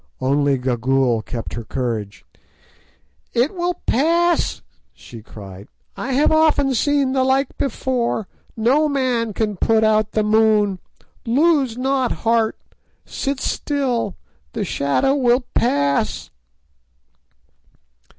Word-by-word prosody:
Only 140 +1 +1
Gagool 125 -1 +1
kept 115 -3 -6
her 120 - -5
courage. 110 -4 -4 1.1
"It 245 +8 +1
will 355 -1 -1
pass," 335 +6 +1 0.3
she 115 -2 -12
cried; 100 -2 -11 0.3
"I 265 - -4
have 285 +5 +3
often 310 -4 +3
seen 280 +2 +1
the 260 -1 +1
like 265 +1 +1
before; 245 -6 -1 0.3
no 270 +8 +2
man 250 -5 0
can 210 -1 -2
put 220 +4 +2
out 215 -1 +2
the 215 - +1
moon; 210 -2 +2 0.4
lose 270 -1 +2
not 265 0 0
heart; 225 -1 +2 0.5
sit 275 -1 -3
still—the 240 - -3
shadow 140 - +1
will 250 -2 +2
pass." 140 - 0
230 Hz, 105 wpm, -20 LUFS, -, 1.1 s, have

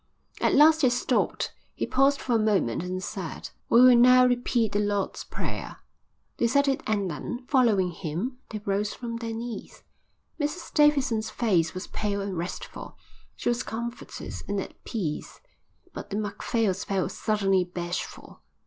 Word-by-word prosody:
At - - +3
last 315 +2 +7
he 260 - +5
stopped. 245 +1 0 0.2
He - - -1
paused 275 +2 +3
for 250 - -1
a 230 - +4
moment 200 - +1
and 185 +1 -4
said: 180 -8 -6 0.2
"We 235 - +7
will 255 -1 +8
now 250 +1 +7
repeat 245 -3 +1
the 205 - +1
Lord's 205 -1 -1
prayer." - - -5 0.6
They 235 - +2
said 280 +4 +3
it 270 -1 +1
and 205 -3 +1
then; 240 - -5
following 220 -10 +3
him, 180 - -4
they 215 -1 -6
rose 205 +1 0
from 235 -1 -5
their 230 -1 -4
knees. 230 0 -7 0.6
Mrs 300 +4 -3
Davidson's 275 -7 +3
face 180 -8 +1
was 185 - -4
pale 205 -1 -2
and 195 -1 -3
restful. 170 +2 -6 0.4
She - - -1
was 240 +1 +1
comforted 235 +1 -6
and 205 0 -1
at - - -8
peace, 175 -10 -4 0.5
but - - -7
the 205 - -3
Macphails 205 -1 -1
felt 195 -2 -1
suddenly 195 -4 +1
bashful. 175 0 -6
220 Hz, 155 wpm, -27 LUFS, 195-245 Hz, 0.6 s, will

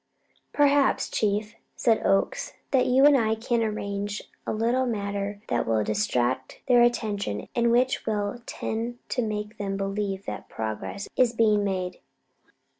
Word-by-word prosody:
"Perhaps, 285 -1 +3
Chief," 210 +1 0 0.2
said 225 -2 +2
Oakes, 195 - +1 0.2
"that 260 -2 +3
you 260 +2 +5
and 290 -1 +7
I 220 -4 +2
can 235 +1 0
arrange 205 -1 -3 0.2
a - - 0
little 240 +4 +1
matter 200 -2 -3
that - - 0
will 110 -1 +2
distract 130 - -1
their 245 -2 +6
attention 210 - 0
and 235 0 +2
which 250 +2 +2
will 210 +2 -1
tend 230 +2 -3
to 250 - 0
make 210 -1 -4
them 195 -1 -2
believe 195 0 -2
that - - -6
progress 110 - -4
is 245 -2 +3
being 215 -3 +3
made." 185 -2 -2
215 Hz, 145 wpm, -26 LUFS, 200-240 Hz, 0.2 s, and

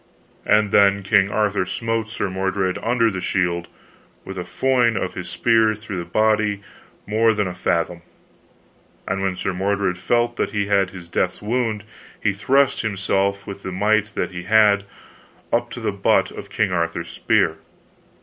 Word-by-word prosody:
And 105 -1 +3
then 100 0 +4
King 95 +1 +3
Arthur 105 -2 +1
smote 115 +4 -2
Sir 105 -2 -2
Mordred 95 0 -1
under 115 -1 +2
the 95 -1 -4
shield, 85 -2 -1 0.6
with 95 - -7
a 90 - -4
foin 125 0 +1
of - - -2
his - - -6
spear 115 -2 +3
throughout 105 -3 -6
the - - -22
body 110 0 +1 0.4
more 110 +2 +2
than 105 -1 0
a 90 - -4
fathom. 85 -1 -1 1.1
And 95 +1 -1
when 95 -1 -1
Sir 95 - -2
Mordred 95 -1 -1
felt 120 +4 +1
that - - -1
he 100 -1 0
had 100 -2 +2
his 90 -2 -11
death's 90 +1 -1
wound, 110 -2 -1 0.4
he 100 - +1
thrust 135 +7 +2
himself, 100 -1 -1
with 100 0 -8
the 95 - -5
might 105 +3 +1
that - - -2
he 90 -1 -7
had, 105 -1 +4 0.7
up - - +1
to - - -7
the - - -1
butt - - +2
of - - -9
King 105 -3 0
Arthur's 85 -1 -2
spear. - - +1
100 Hz, 170 wpm, -21 LUFS, 95-110 Hz, 1.1 s, then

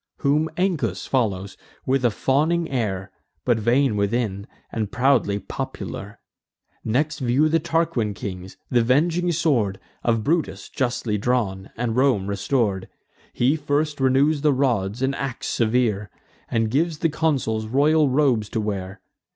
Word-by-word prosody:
Whom 150 +3 +2
Ancus 145 - 0
follows, 100 -7 -1 0.3
with 135 0 +1
a 120 - +5
fawning 155 +9 +1
air, 95 -7 -2 0.3
But 120 -3 +2
vain 120 +2 +2
within, 100 -1 -1 0.2
and 110 -3 -3
proudly 125 -5 +2
popular. - - -6 0.6
Next 150 +7 0
view 130 +4 +2
the 165 +1 +3
Tarquin 160 -11 0
kings, 95 -4 -7 0.2
th' - - +4
avenging 160 +9 +2
sword 125 - +1 0.2
Of 115 -2 +1
Brutus, 165 +4 -1
justly 120 -5 -1
drawn, 100 -5 -1
and 115 -1 -1
Rome 125 -7 +3
restor'd. 100 0 -1 0.4
He 130 +5 +2
first 145 0 -1
renews 135 +3 +3
the 150 -1 +3
rods 120 -4 0
and 135 +1 +1
ax 135 -2 -4
severe, 110 -3 +1 0.4
And 115 -2 0
gives 160 +4 +1
the 165 - +1
consuls 135 -9 0
royal 145 +4 +3
robes 130 -6 +2
to - - -2
wear. 95 -2 -4
125 Hz, 135 wpm, -23 LUFS, 105-145 Hz, 0.6 s, a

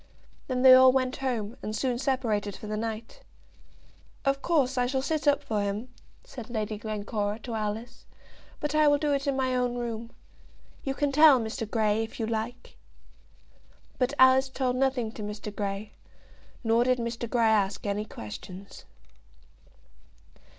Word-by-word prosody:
Then 255 -1 -1
they 260 -1 +10
all 260 0 +8
went 255 0 0
home, 240 -4 -3
and 215 - -4
soon 245 0 -1
separated 220 -7 -1
for - - -10
the 215 0 -3
night. 225 - -5 1.0
"Of 275 0 +1
course 280 -6 +1
I 250 -1 +1
shall 265 +1 -1
sit 310 +1 -1
up 285 0 +3
for 215 -2 -1
him," 205 +5 -3 0.3
said 250 - -10
Lady 215 -2 -3
Glencora 210 -1 -3
to 235 - -5
Alice, 220 +2 -4 0.5
"but 295 0 -2
I 305 0 +4
will 290 0 +5
do 295 0 0
it 275 0 -1
in 275 - +1
my 260 -1 0
own 250 -1 0
room. 230 -1 -4 0.7
You 270 -1 -2
can 290 -1 0
tell 295 -2 +7
Mr. 225 -1 -4
Grey, 215 -1 +1
if 225 - -9
you 225 - 0
like." 225 +2 -5 1.2
But 260 +2 +1
Alice 260 +1 +6
told 260 -1 -1
nothing 255 -4 0
to 220 - -9
Mr. 210 0 -6
Grey, 200 0 -4 0.7
nor 230 +1 +3
did 255 0 +2
Mr. 235 0 -4
Grey 235 -2 +2
ask 210 -3 +1
any 205 +1 -1
questions. 180 - -10
240 Hz, 160 wpm, -28 LUFS, 215-265 Hz, 1.2 s, they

